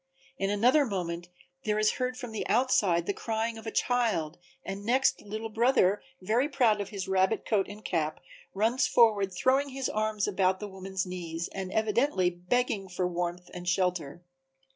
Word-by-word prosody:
In 195 - 0
another 245 +9 +4
moment 175 -6 -3 0.3
there 210 -1 0
is 215 0 +3
heard 255 -1 -2
from 245 -3 -6
the 220 - -3
outside 205 -8 +2
the 200 - -1
crying 225 +1 -2
of 225 - -10
a - - -2
child 215 -13 0 0.3
and 195 +1 -5
next 255 +5 +2
"Little 215 +2 -5
Brother," 220 -3 +3 0.2
very 235 +9 +1
proud 230 -7 +3
of 200 - -5
his 195 -3 -5
rabbit 190 +3 +1
coat 200 -4 +1
and 210 +1 -11
cap, 155 -3 -1 0.4
runs 230 +6 +2
forward 210 -5 +4
throwing 265 +9 +2
his 270 -1 -3
arms 215 -1 -1
about 190 -2 +1
the 210 - -5
woman's 190 -1 -4
knees 170 -2 -5
and 190 -1 -5
evidently 220 -3 +2
begging 195 +3 -1
for 180 0 -1
warmth 175 0 -4
and 180 0 -4
shelter. 180 -4 -1
205 Hz, 170 wpm, -29 LUFS, 180-230 Hz, 0.4 s, another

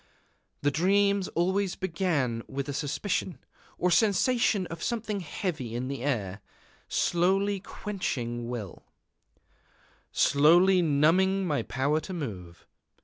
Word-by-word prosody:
The 145 - +3
dreams 200 +4 +2
always 190 +2 +1
began 160 -10 -1
with 135 0 -4
a 145 - -3
suspicion, 160 +3 -2 0.4
or 180 - +1
sensation 210 +2 +2
of 165 -1 -8
something 215 -2 -2
heavy 155 - -4
in 125 +2 -3
the 135 -3 -4
air, 105 -8 -2 0.5
slowly 195 +3 +1
quenching 120 - -4
will, 110 -8 -6 1.3
slowly 175 +6 +5
numbing 175 +6 +3
my 150 -5 0
power 140 +4 0
to 160 +5 -7
move. 95 - -7
165 Hz, 110 wpm, -28 LUFS, 135-190 Hz, 1.3 s, slowly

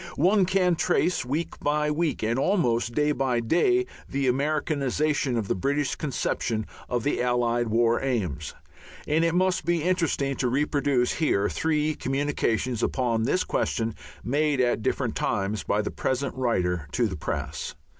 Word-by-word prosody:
One 190 +4 +4
can 185 -1 +2
trace 180 +1 +1
week 145 +7 -3
by 150 +1 +1
week 155 -3 -1
and 115 +4 +1
almost 120 - +1
day 150 0 +2
by 130 -4 0
day 270 - +2 0.2
the 140 0 -1
Americanization 145 0 0
of 110 -3 -2
the - - +1
British 140 +8 0
conception 115 -6 -2 0.2
of 120 -2 -1
the 145 - 0
Allied 120 -1 +1
War 115 +1 +2
Aims. 110 - -2 0.5
It 155 +2 +2
may 185 +2 +3
be 170 -1 0
interesting 165 -6 0
to 125 - 0
reproduce 140 -1 +1
here 105 -10 +1
three 155 -1 0
communications 130 -4 -1
upon 115 -4 0
this 185 - +1
question 115 -3 -1 0.3
made 145 +2 +1
at 120 -3 +2
different - - -1
times 100 +2 -1
by 105 +1 0
the - - -3
present 130 +1 -2
writer 90 - 0
to 120 - +2
the 100 -4 -2
press. - - -4
135 Hz, 150 wpm, -26 LUFS, 120-155 Hz, 0.5 s, One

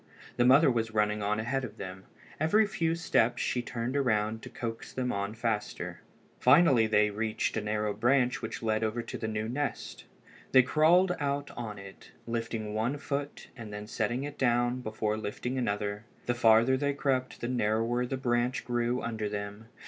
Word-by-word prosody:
The 120 - +4
mother 135 +3 +6
was 115 -2 -2
running 105 0 +1
on 105 +1 0
ahead 130 +4 -1
of 115 -4 -7
them. 95 0 -8 0.3
Every 185 +8 +4
few 165 -5 0
steps 120 -8 +1
she 125 - 0
turned 120 0 -4
around 110 -5 +1
to - - -9
coax 115 -1 -6
them 125 -1 -2
on 100 +2 -3
faster. 110 -2 -3 0.4
Finally 130 -4 +5
they 105 -1 +3
reached 110 +1 -1
a 110 - 0
narrow 105 0 -1
branch 125 +4 +2
which 110 0 -5
led 110 0 +1
over 110 +2 -1
to 115 - -7
the 110 - -3
new 110 0 -2
nest. 140 +4 -4 0.5
They 130 -1 +8
crawled 175 +6 +4
out 145 -1 -2
on 110 -3 -6
it, 100 0 -12
lifting 115 -2 -3
one 115 +6 -1
foot 145 0 -4
and 115 -5 -8
then 105 0 -6
setting 120 +4 -2
it 145 0 -7
down 120 0 +2
before 110 -1 -2
lifting 125 +5 -3
another. 105 -2 -2 0.2
The 120 - +1
farther 115 +2 +5
they 140 +1 0
crept 130 -2 -1
the 120 - -3
narrower 120 +1 0
the 135 - -3
branch 120 0 0
grew 120 0 0
under 110 -2 -2
them. 100 +1 -6
120 Hz, 180 wpm, -30 LUFS, 110-130 Hz, 0.5 s, They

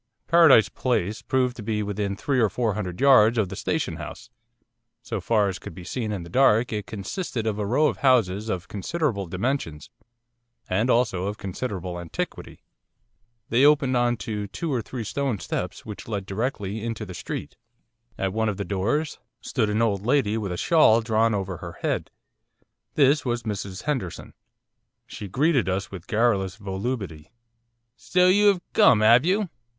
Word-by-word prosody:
Paradise 165 -9 +6
Place 110 -5 -1
proved 130 -1 0
to - - -6
be 105 0 -2
within 100 -1 -2
three 130 +5 -1
or 110 -3 +3
four 110 +1 -1
hundred 95 -4 -5
yards 120 -4 +6
of 105 -4 +1
the 95 - -6
Station 100 - -2
House. 115 +9 -9 0.7
So - - -4
far 105 -3 +2
as 95 -1 -4
could - - -10
be 90 - -9
seen 110 +4 -3
in 95 -4 -4
the - - -10
dark 120 -1 +3
it 105 -2 -4
consisted 115 - -4
of 105 -1 -1
a 105 - -1
row 135 +8 +3
of - - +1
houses 110 -6 +2
of 95 -1 -3
considerable 105 - -2
dimensions, 90 - -3 0.8
and 105 +7 0
also 105 -7 +1
of 105 +1 -4
considerable 95 -3 -5
antiquity. 85 -2 -6 0.9
They 120 +4 +3
opened 140 -3 +4
on 120 -1 +2
to 105 -2 -3
two 155 - -4
or 125 - 0
three 120 +1 -6
stone 135 +1 -2
steps 90 -1 -5
which 105 -2 -8
led 100 -4 -3
directly 105 0 -3
into 115 -2 -4
the 95 - -8
street. - - -6 0.6
At 95 -1 -2
one 110 0 0
of 100 - -3
the 100 - -3
doors 115 +11 -1 0.2
stood 110 -5 -1
an 110 +2 +1
old 100 -4 0
lady 120 -3 +2
with 105 -4 -3
a 90 - -3
shawl 150 - +4
drawn 115 -1 +2
over 95 -2 -3
her 85 0 -8
head. - - -1 0.9
This 145 +1 +4
was 120 -2 -2
Mrs 100 -3 -5
Henderson. 130 - -4 0.7
She 105 - -8
greeted 135 - +1
us 95 +1 -2
with 95 -2 -9
garrulous 105 -5 +1
volubility. 100 -5 -5 0.7
'So 180 +4 +2
you 205 +2 +5
'ave 190 -3 +1
come, 110 -2 +5
'ave 120 +7 +6
you? 200 0 +1
110 Hz, 175 wpm, -25 LUFS, 100-125 Hz, 0.9 s, Paradise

